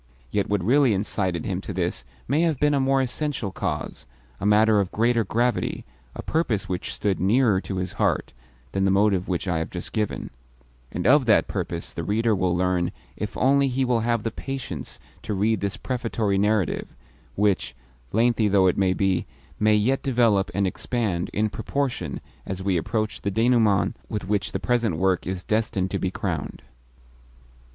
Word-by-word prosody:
Yet 100 Hz, -, 0 dB
what 100 Hz, -3 st, 0 dB
really 125 Hz, +1 st, +4 dB
incited 95 Hz, -4 st, -1 dB
him 95 Hz, -1 st, -2 dB
to 100 Hz, -, -6 dB
this 85 Hz, -8 st, -2 dB, 0.2 s
may 145 Hz, +5 st, +2 dB
have 165 Hz, -5 st, +1 dB
been 145 Hz, 0 st, +3 dB
a 140 Hz, -, +2 dB
more 135 Hz, 0 st, +3 dB
essential 130 Hz, -5 st, -2 dB
cause, -, -, -4 dB, 0.3 s
a 100 Hz, -, -1 dB
matter 105 Hz, 0 st, +5 dB
of 95 Hz, -3 st, -1 dB
greater 115 Hz, +1 st, +2 dB
gravity, 120 Hz, +3 st, -1 dB, 0.3 s
a -, -, -6 dB
purpose 125 Hz, -, 0 dB
which 90 Hz, -1 st, -3 dB
stood 100 Hz, -2 st, -1 dB
nearer 105 Hz, 0 st, +3 dB
to 100 Hz, -, -5 dB
his 90 Hz, 0 st, -3 dB
heart, 70 Hz, -, 0 dB, 0.4 s
than 95 Hz, -, 0 dB
the 95 Hz, -, +3 dB
motive 95 Hz, -1 st, +2 dB
which 90 Hz, +1 st, -2 dB
I 85 Hz, -3 st, +1 dB
have 80 Hz, -, -3 dB
just 90 Hz, -, -6 dB
given; 105 Hz, -2 st, -2 dB, 0.6 s
and 90 Hz, -, -4 dB
of 135 Hz, -1 st, +5 dB
that 110 Hz, -, +4 dB
purpose -, -, -4 dB
the -, -, -4 dB
reader 110 Hz, +2 st, +1 dB
will 90 Hz, -2 st, +1 dB
learn 90 Hz, -1 st, +1 dB, 0.2 s
if 105 Hz, -, -5 dB
only 140 Hz, +1 st, +4 dB
he 130 Hz, 0 st, 0 dB
will 125 Hz, -2 st, +2 dB
have 115 Hz, -1 st, 0 dB
the 115 Hz, -, -2 dB
patience 130 Hz, -, -6 dB, 0.2 s
to 105 Hz, -, -3 dB
read 105 Hz, +1 st, +1 dB
this 100 Hz, -1 st, -2 dB
prefatory 115 Hz, -5 st, -1 dB
narrative 105 Hz, -4 st, +1 dB, 0.5 s
(which, 100 Hz, -11 st, +1 dB, 0.4 s
lengthy 115 Hz, 0 st, +3 dB
though 100 Hz, -2 st, +4 dB
it 90 Hz, -, +2 dB, 0.2 s
be, 95 Hz, -3 st, +1 dB, 0.3 s
may 105 Hz, 0 st, +4 dB
yet 120 Hz, +6 st, +2 dB
develop 115 Hz, -7 st, +2 dB
and 100 Hz, 0 st, +2 dB
expand 95 Hz, -2 st, -2 dB
in 110 Hz, +1 st, +1 dB
proportion 140 Hz, +4 st, -3 dB, 0.2 s
as 95 Hz, 0 st, -5 dB
we 95 Hz, -1 st, +1 dB
approach 110 Hz, +6 st, -1 dB
the 100 Hz, -, -1 dB
denouement 110 Hz, -2 st, +3 dB
with 105 Hz, -3 st, -4 dB
which 100 Hz, -2 st, 0 dB
the -, -, -2 dB
present 115 Hz, -8 st, 0 dB
work 95 Hz, 0 st, +1 dB
is 95 Hz, -1 st, -3 dB
destined 105 Hz, -3 st, 0 dB
to -, -, -1 dB
be 95 Hz, -, 0 dB
crowned). -, -, -4 dB
105 Hz, 175 wpm, -24 LUFS, 95-120 Hz, 0.6 s, matter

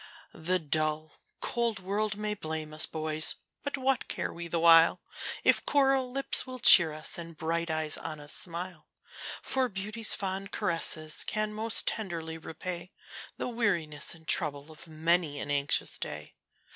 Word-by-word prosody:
The 175 Hz, +3 st, -1 dB
dull, 155 Hz, -1 st, -2 dB, 0.3 s
cold 235 Hz, -2 st, -1 dB
world 205 Hz, +3 st, -2 dB
may 210 Hz, 0 st, -2 dB
blame 155 Hz, -5 st, -5 dB
us, 155 Hz, -, +2 dB
boys! 155 Hz, 0 st, +1 dB, 0.3 s
but 285 Hz, -1 st, -3 dB
what 265 Hz, -1 st, 0 dB
care -, -, -4 dB
we 170 Hz, 0 st, -7 dB
the 170 Hz, -, -2 dB
while, 165 Hz, 0 st, +6 dB, 0.4 s
If -, -, +4 dB
coral 270 Hz, -2 st, +2 dB
lips 275 Hz, 0 st, 0 dB
will 255 Hz, 0 st, -7 dB
cheer 175 Hz, -8 st, +8 dB
us, 155 Hz, +2 st, -1 dB
and 165 Hz, -1 st, -9 dB
bright 170 Hz, +1 st, -2 dB
eyes 155 Hz, -1 st, +1 dB
on 155 Hz, -1 st, -6 dB
us 145 Hz, 0 st, -2 dB
smile? 170 Hz, -2 st, -3 dB, 0.6 s
For 260 Hz, -1 st, 0 dB
beauty's 215 Hz, +3 st, +1 dB
fond 195 Hz, 0 st, -4 dB
caresses 155 Hz, -2 st, +2 dB
can 215 Hz, 0 st, -2 dB
most 220 Hz, +1 st, 0 dB
tenderly 165 Hz, -6 st, -4 dB
repay 175 Hz, +3 st, -6 dB, 0.4 s
The -, -, -3 dB
weariness 175 Hz, -12 st, -1 dB
and 160 Hz, -1 st, -18 dB
trouble 145 Hz, +1 st, +2 dB
of 155 Hz, +2 st, -10 dB
many 160 Hz, -1 st, 0 dB
an 145 Hz, -, -4 dB
anxious 140 Hz, 0 st, 0 dB
day. -, -, -6 dB
170 Hz, 155 wpm, -29 LUFS, 155-210 Hz, 0.6 s, cheer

